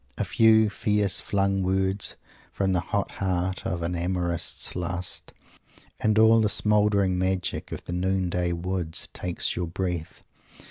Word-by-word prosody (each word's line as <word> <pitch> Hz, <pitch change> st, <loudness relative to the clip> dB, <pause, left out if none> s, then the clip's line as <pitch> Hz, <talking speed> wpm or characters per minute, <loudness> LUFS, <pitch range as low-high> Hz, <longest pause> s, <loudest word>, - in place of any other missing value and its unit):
A -, -, -1 dB
few 110 Hz, -1 st, +4 dB
fierce 105 Hz, -2 st, +1 dB
flung 100 Hz, -1 st, 0 dB
words, 95 Hz, +1 st, 0 dB, 0.4 s
from 95 Hz, -1 st, 0 dB
the 90 Hz, -, +2 dB
hot 100 Hz, +3 st, -2 dB
heart 95 Hz, -1 st, -2 dB
of 85 Hz, -2 st, -3 dB
an 85 Hz, +1 st, -2 dB
amorist's 85 Hz, -1 st, -2 dB
lust, 90 Hz, 0 st, -3 dB, 0.7 s
and 110 Hz, 0 st, +2 dB
all 110 Hz, +1 st, +6 dB
the 105 Hz, -, +2 dB
smouldering 105 Hz, -3 st, +3 dB
magic 95 Hz, -1 st, -2 dB
of -, -, -7 dB
the 85 Hz, -, -5 dB
noon 95 Hz, +1 st, 0 dB
day 90 Hz, 0 st, -1 dB
woods 85 Hz, -1 st, -3 dB
takes 90 Hz, -1 st, -2 dB
your 90 Hz, -1 st, -2 dB
breath. 90 Hz, -2 st, -4 dB
95 Hz, 145 wpm, -26 LUFS, 90-100 Hz, 0.7 s, all